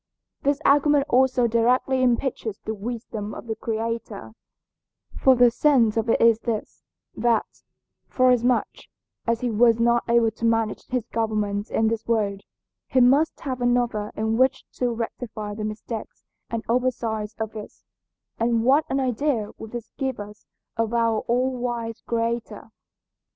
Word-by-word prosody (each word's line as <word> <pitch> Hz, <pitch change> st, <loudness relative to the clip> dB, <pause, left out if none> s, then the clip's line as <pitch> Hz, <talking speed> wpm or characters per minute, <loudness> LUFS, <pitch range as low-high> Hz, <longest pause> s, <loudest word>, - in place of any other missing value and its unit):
This 285 Hz, 0 st, +1 dB
argument 290 Hz, 0 st, +4 dB
also 255 Hz, 0 st, +3 dB
directly 245 Hz, +3 st, +2 dB
impeaches 240 Hz, -3 st, 0 dB
the 220 Hz, -, -2 dB
wisdom 215 Hz, -1 st, -5 dB
of -, -, -9 dB
the 225 Hz, -1 st, -3 dB
Creator, 225 Hz, -2 st, -4 dB, 0.8 s
for 265 Hz, -1 st, +5 dB
the 245 Hz, -1 st, +5 dB
sense 240 Hz, -5 st, +3 dB
of 225 Hz, 0 st, -1 dB
it -, -, +3 dB
is 230 Hz, -1 st, +5 dB
this, 225 Hz, -3 st, -4 dB, 0.3 s
that, 235 Hz, -2 st, +2 dB, 0.6 s
forasmuch 250 Hz, -1 st, +1 dB, 0.4 s
as 230 Hz, 0 st, +1 dB
he 245 Hz, -2 st, -1 dB
was 230 Hz, +1 st, +4 dB
not 235 Hz, 0 st, +3 dB
able 235 Hz, -1 st, +4 dB
to 225 Hz, -, -13 dB
manage 225 Hz, -2 st, 0 dB
his 250 Hz, -3 st, -2 dB
government 210 Hz, -3 st, -2 dB
in 220 Hz, -, +1 dB
this 225 Hz, 0 st, -2 dB
world, 205 Hz, -4 st, 0 dB, 0.5 s
he 260 Hz, -, +2 dB
must 275 Hz, +6 st, +3 dB
have 260 Hz, -4 st, -4 dB
another 240 Hz, -4 st, 0 dB
in 220 Hz, +1 st, 0 dB
which 260 Hz, +1 st, +2 dB
to 250 Hz, -, -1 dB
rectify 225 Hz, -2 st, -5 dB
the 215 Hz, +1 st, -5 dB
mistakes 215 Hz, +1 st, -6 dB, 0.2 s
and 230 Hz, -1 st, -3 dB
oversights 230 Hz, -3 st, -1 dB
of 220 Hz, -1 st, -3 dB
this, 210 Hz, -, -10 dB, 0.5 s
and 230 Hz, 0 st, +1 dB
what 275 Hz, +5 st, +4 dB
an 270 Hz, -, 0 dB
idea 255 Hz, -3 st, -1 dB
would 220 Hz, -, -8 dB
this 240 Hz, 0 st, -7 dB
give 265 Hz, -4 st, -2 dB
us 210 Hz, 0 st, -10 dB, 0.3 s
of 225 Hz, +1 st, 0 dB
our 230 Hz, -2 st, +2 dB
All 255 Hz, +2 st, +1 dB
wise 235 Hz, -2 st, -4 dB
Creator? 230 Hz, 0 st, -3 dB
230 Hz, 150 wpm, -24 LUFS, 220-250 Hz, 0.8 s, for